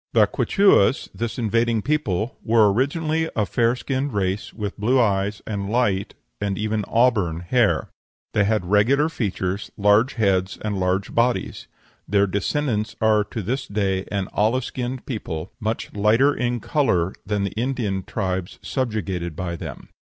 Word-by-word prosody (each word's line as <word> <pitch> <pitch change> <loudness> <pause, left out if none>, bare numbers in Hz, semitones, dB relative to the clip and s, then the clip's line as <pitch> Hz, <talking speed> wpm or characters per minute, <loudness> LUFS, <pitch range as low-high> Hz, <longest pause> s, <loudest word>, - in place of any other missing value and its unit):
The - - +6
Quichuas 195 - +3
this 115 -1 -4
invading 115 -1 +1
people 125 -7 -1
were 110 -3 +4
originally 160 +6 0
a 105 - +1
fair 115 +3 +1
skinned 135 +1 -2
race, 100 +3 -1
with 105 -3 -5
blue 125 +6 +3
eyes 100 -2 +1
and 100 -2 -3
light 105 -5 0 0.3
and 100 -1 -1
even 110 0 -1
auburn 110 -9 +2
hair; 115 +5 +2 0.5
they 105 - +3
had 105 -2 +1
regular 120 - +3
features, 100 - -3
large 105 +5 +3
heads, 95 -4 +1
and 105 -2 -1
large 95 +1 0
bodies. 120 +1 0 0.4
Their 100 0 +3
descendants 105 +2 -1
are 110 -1 +3
to 110 - -5
this 130 +8 -2
day 95 -2 -1
an 100 -2 -1
olive 115 +5 +1
skinned 125 0 -4
people, 90 - -5
much 110 +1 -3
lighter 110 +8 +3
in 120 -2 -1
color 95 - +1
than 105 -1 -1
the 100 - -2
Indian 115 -5 -1
tribes 95 -3 -3
subjugated 100 - -2
by 85 0 -3
them. - - -8
105 Hz, 150 wpm, -23 LUFS, 100-125 Hz, 0.5 s, The